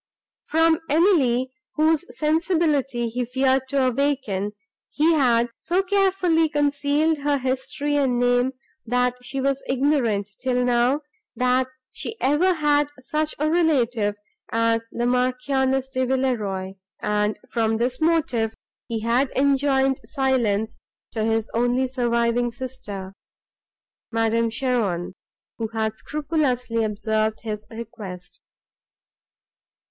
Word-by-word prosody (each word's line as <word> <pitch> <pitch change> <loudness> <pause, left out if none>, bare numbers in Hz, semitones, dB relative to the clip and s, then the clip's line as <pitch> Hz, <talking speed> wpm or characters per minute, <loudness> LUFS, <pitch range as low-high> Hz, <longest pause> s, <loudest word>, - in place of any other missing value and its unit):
From 325 0 +3
Emily, 280 -7 +3 0.2
whose 315 +1 +2
sensibility 300 -6 +1
he 245 +2 -2
feared 260 +2 +1
to 270 0 +1
awaken, 255 -7 0 0.4
he 320 +3 +3
had 240 -5 +3
so 355 +4 0
carefully 370 -4 +2
concealed 290 +1 +1
her 285 0 +1
history 265 +3 -1
and 265 -4 +2
name, 245 +1 +2 0.3
that 250 +1 +1
she 270 +2 -5
was 275 0 0
ignorant, 250 -7 +1
till 250 -1 0
now, 245 +4 +2 0.3
that 255 0 +2 0.2
she 450 - -7
ever 300 +8 +3
had 295 -2 +2
such 305 +4 -2
a 300 - 0
relative 245 -11 +2 0.4
as 230 0 +2
the 240 - -2
Marchioness 255 +2 +1
de 260 -1 -1
Villeroi; 215 -8 -1 0.3
and 210 0 0
from 225 -1 +1
this 245 +4 -1
motive 305 -9 +1 0.3
he 225 -2 -3
had 245 +4 +1
enjoined 270 -1 +2
silence 240 -7 0 0.3
to 220 - -2
his 225 0 0
only 245 +2 +1
surviving 240 -1 +1
sister, 230 -6 -7 1.0
Madame 230 0 +1
Cheron, 225 -8 -1 0.5
who 225 - -1
had 220 -1 -2
scrupulously 275 -6 -1
observed 215 +1 -1
his 215 -1 -5
request. 220 -6 -9
255 Hz, 110 wpm, -23 LUFS, 230-285 Hz, 1.0 s, From